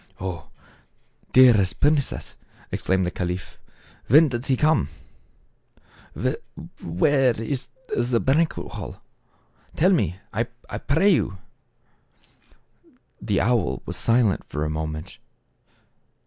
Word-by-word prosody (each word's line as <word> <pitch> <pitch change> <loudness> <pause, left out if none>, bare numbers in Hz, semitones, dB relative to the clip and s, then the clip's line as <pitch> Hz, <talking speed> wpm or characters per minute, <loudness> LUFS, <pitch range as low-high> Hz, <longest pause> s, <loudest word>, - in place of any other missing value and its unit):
" - - -34
Oh! 90 -3 -5 0.8
dearest 120 -8 +5
princess," 145 -2 0 0.4
exclaimed 95 -1 0
the 90 - -2
caliph, 90 0 -4 0.2
" - - -28
When 150 +5 +6
does 120 0 -4
he 130 - +2
come; 155 - +2 1.9
where 125 - +2
is 125 +3 -3 0.3
the 120 0 +1
banquet 155 +7 0
hall? - - -7 0.8
Tell 180 +5 +4
me, 100 - +1 0.2
I 115 +4 0 0.3
pray 160 +8 +2
you." - - +1 1.8
The 100 -3 0
owl 120 -1 0
was - - -4
silent 115 -6 +2
for 75 0 -3
a 75 - -2
moment. 80 0 -5
120 Hz, 105 wpm, -24 LUFS, 90-140 Hz, 1.9 s, When